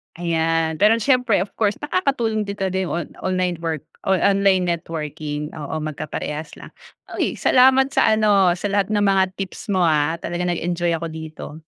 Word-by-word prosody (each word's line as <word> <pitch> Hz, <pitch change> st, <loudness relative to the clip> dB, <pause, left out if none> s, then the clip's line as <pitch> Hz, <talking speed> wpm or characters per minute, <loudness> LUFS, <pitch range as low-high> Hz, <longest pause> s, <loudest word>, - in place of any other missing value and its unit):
Ayan, 165 Hz, -1 st, 0 dB
pero 210 Hz, +3 st, +5 dB
siyempre, 245 Hz, -4 st, +2 dB
of 200 Hz, -, -13 dB
course 210 Hz, -2 st, +2 dB
nakakatulong 255 Hz, -, 0 dB
dito 200 Hz, -2 st, -2 dB
din 190 Hz, -1 st, -1 dB
on 170 Hz, 0 st, -4 dB
online 185 Hz, -2 st, -1 dB
work 165 Hz, -3 st, -3 dB, 0.2 s
o 190 Hz, -, +4 dB
online 195 Hz, 0 st, +3 dB
networking. 155 Hz, -3 st, -4 dB
Oo, 150 Hz, 0 st, -6 dB
magkaparehas 155 Hz, 0 st, -5 dB
lang. -, -, -12 dB, 0.5 s
Uy, -, -, 0 dB
salamat 265 Hz, +1 st, +4 dB
sa 220 Hz, -, +3 dB
ano 200 Hz, -5 st, +3 dB
sa 200 Hz, +3 st, -3 dB
lahat 200 Hz, -1 st, +1 dB
ng 205 Hz, -, +2 dB
mga 190 Hz, -2 st, +2 dB
tips 195 Hz, -1 st, -7 dB
mo, 190 Hz, -3 st, +1 dB
ah, 155 Hz, -1 st, +2 dB
talagang 175 Hz, +1 st, -4 dB
nag-enjoy 175 Hz, 0 st, -1 dB
ako 165 Hz, +1 st, -4 dB
dito. 160 Hz, -1 st, -8 dB
180 Hz, 165 wpm, -21 LUFS, 160-205 Hz, 0.5 s, pero